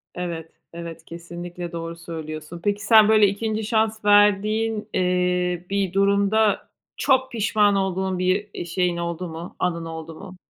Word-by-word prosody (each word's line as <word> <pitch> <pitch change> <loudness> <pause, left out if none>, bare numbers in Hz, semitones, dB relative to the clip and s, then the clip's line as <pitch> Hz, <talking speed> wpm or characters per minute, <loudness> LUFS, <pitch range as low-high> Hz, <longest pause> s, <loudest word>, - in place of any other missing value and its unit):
evet, 170 -2 -5 0.2
evet, 170 -1 -8
kesinlikle 175 +1 -8
doğru 165 0 -5
söylüyorsun. 160 -1 -7
Peki, 205 0 0
sen 220 -2 +7
böyle 215 -2 +6
2'nci 215 +2 -2
şans 220 -1 0
verdiğin, 210 +2 +3
eee, 180 -1 0
bir 195 -2 -1
durumda 200 +2 +2 0.3
çok 260 -1 +2
pişman 210 -2 +2
olduğun 190 -1 -1
bir, 185 +3 0
eee, - - -5
şeyin 175 0 0
oldu 170 +1 -3
mu, 165 +1 -8
anın 170 -2 -1
oldu 160 0 -7
mu? 185 +2 -11
185 Hz, 145 wpm, -23 LUFS, 170-210 Hz, 0.3 s, sen